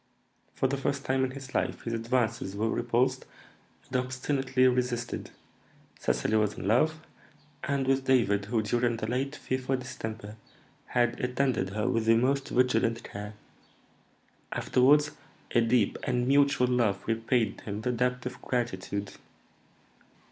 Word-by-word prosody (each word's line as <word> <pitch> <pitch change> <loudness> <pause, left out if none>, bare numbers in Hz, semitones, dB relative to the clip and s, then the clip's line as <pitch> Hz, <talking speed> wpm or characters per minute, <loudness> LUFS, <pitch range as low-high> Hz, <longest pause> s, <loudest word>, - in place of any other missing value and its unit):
For - - 0
the 135 +1 +1
first 140 0 -2
time 130 0 +1
in 130 - +1
his 135 0 -9
life - - -1
his 115 - -3
advances 115 -3 -1
were 110 +2 0
repulsed 125 +2 +1 0.6
and 130 - -1
obstinately 130 0 +1
resisted; 125 -1 -1 0.7
Cecily 110 - +1
was 105 -1 +1
in - - -5
love, 155 +9 +2 0.6
and 140 0 0
with 135 0 +1
David, 105 -6 +3
who, 110 +1 0
during 120 +2 +1
the 110 - -3
late 130 +5 -2
fearful 130 0 -2
distemper, 110 -4 -7 0.5
had 120 -1 +1
attended 125 -6 0
her 105 - 0
with 115 -1 +1
the 115 - +6
most 135 +3 +1
vigilant 115 -2 +2
care. 105 +1 -7 1.2
Afterwards 145 +4 +3 0.4
a 120 - +4
deep 115 -2 +2
and 125 0 0
mutual 140 -1 +4
love 115 -6 +1
repaid 115 -1 0
him 105 0 -5
the 125 - 0
debt 125 +1 -1
of 125 - -6
gratitude. 100 -4 -2
125 Hz, 140 wpm, -29 LUFS, 115-130 Hz, 1.2 s, the